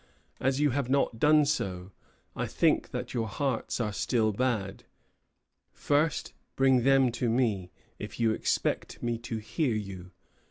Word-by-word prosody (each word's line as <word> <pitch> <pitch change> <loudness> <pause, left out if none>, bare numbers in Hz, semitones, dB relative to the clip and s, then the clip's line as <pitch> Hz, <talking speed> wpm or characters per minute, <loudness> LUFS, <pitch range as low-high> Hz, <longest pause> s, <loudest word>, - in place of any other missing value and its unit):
As 135 +1 +1
you 145 -2 +3
have 135 -1 -1
not 135 -4 +1
done 150 +1 +5
so, 95 -9 -2 0.4
I - - -2
think - - +1
that - - -5
your 115 -3 -1
hearts 130 +2 -2
are 105 -3 -1
still 110 +1 +1
bad. 105 -4 -2 0.9
First 150 +2 0 0.2
bring 135 -2 +4
them 135 0 +4
to 120 0 -1
me, 110 -7 0 0.3
if 105 - -7
you 115 -1 +3
expect - - -1
me 120 -1 -1
to 115 -1 -5
hear 120 +4 -1
you. 95 -4 -6
120 Hz, 150 wpm, -29 LUFS, 110-135 Hz, 0.9 s, done